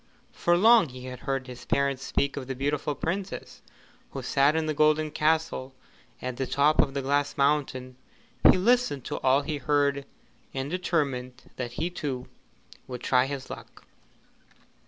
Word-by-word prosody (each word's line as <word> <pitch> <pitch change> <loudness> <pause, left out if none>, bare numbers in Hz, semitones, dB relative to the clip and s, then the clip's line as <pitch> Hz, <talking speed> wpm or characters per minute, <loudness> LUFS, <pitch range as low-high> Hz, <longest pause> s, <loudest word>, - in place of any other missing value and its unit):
For 175 0 +2
long 220 - +6
he 125 0 -10
had 125 -1 -7
heard 135 -1 -2
his 125 -1 -10
parents 140 -1 0
speak 140 0 0
of 130 -3 -5
the 135 - -3
beautiful 145 +2 -1
Princess 185 +7 -4 0.5
who - - -6
sat 140 +3 +3
in 160 -1 +1
the 155 - -1
golden 155 +1 +3
castle 155 -4 0 0.5
at 125 -1 -4
the 135 -1 -2
top 150 +2 +4
of 135 - -2
the 140 - -1
Glass 145 +1 0
Mountain. 140 -3 0 0.5
He - - +7
listened 215 - +2
to - - -3
all 135 +2 +3
he 150 0 -3
heard, 140 0 +1 0.5
and 135 +2 -3
determined 140 -9 -2
that 120 -2 -4
he 170 +7 -2
too 135 -7 -4 0.6
would 125 -2 -6
try 125 0 +3
his 135 -2 -6
luck. - - -11
140 Hz, 160 wpm, -27 LUFS, 130-155 Hz, 0.6 s, He